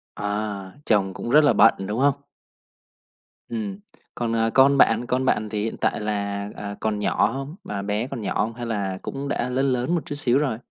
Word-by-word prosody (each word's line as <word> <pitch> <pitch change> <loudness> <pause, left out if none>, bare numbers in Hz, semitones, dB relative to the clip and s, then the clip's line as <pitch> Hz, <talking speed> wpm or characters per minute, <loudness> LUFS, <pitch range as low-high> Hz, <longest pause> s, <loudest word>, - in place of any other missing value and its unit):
À, 105 -2 -3
chồng 100 -4 +2
cũng 120 - -6
rất 150 +5 +6
là 145 - +5
bận, - - +6
đúng 105 +3 -2
hông? 140 +1 +2 1.3
Ừm. 105 -4 -4 0.4
Còn, 115 -1 -1
ờ, 115 0 +2
con 140 +1 +6
bạn? 115 -2 +4
Con 130 +2 0
bạn 110 -4 +1
thì 105 -1 -2
hiện 115 - -3
tại - - 0
là, 100 -1 -2
à, 100 -1 -6
còn 110 -1 -1
nhỏ 100 - +2
hông? 135 +4 -5
Mà 100 -1 -4
bé 105 +4 -1
còn 120 - -6
nhỏ 105 - -2
hông 115 +2 -3
hay 120 +1 -6
là 100 -5 -2
cũng 140 +1 -5
đã 125 -2 -1
lớn 135 +2 +1
lớn 125 +8 0
một 170 - 0
chút 150 -3 -5
xíu 135 -3 +2
rồi? 135 -6 0
115 Hz, 215 wpm, -24 LUFS, 105-130 Hz, 1.3 s, rất